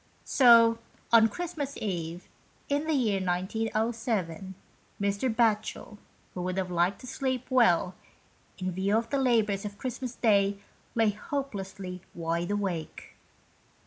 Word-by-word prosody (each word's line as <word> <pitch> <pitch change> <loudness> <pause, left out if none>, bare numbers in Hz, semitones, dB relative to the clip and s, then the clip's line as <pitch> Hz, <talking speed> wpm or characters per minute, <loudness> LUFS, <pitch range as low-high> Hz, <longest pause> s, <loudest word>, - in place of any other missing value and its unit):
So 230 -3 +6 0.3
on 225 -1 +8
Christmas 315 -4 -4
Eve, 175 -4 -4 0.4
in 285 +2 0
the 315 - +2
year 215 -7 +1
1907, 200 -1 -2 0.4
Mr. 200 +5 0
Batchel, 220 -2 0 0.3
who 180 - -4
would 185 +1 -2
have 185 -1 -2
liked 175 +3 +1
to - - -10
sleep 260 -1 -2
well, 190 -8 +4 0.6
in 185 -1 -2
view 195 +4 +1
of 230 0 -3
the 280 - +1
labours 220 -6 +2
of 205 -1 -6
Christmas 255 0 -5
Day, 200 -3 +3 0.4
lay 225 -2 +3
hopelessly 195 -7 -5
wide 170 +1 -2
awake. 195 -6 -3
210 Hz, 125 wpm, -28 LUFS, 185-240 Hz, 0.6 s, on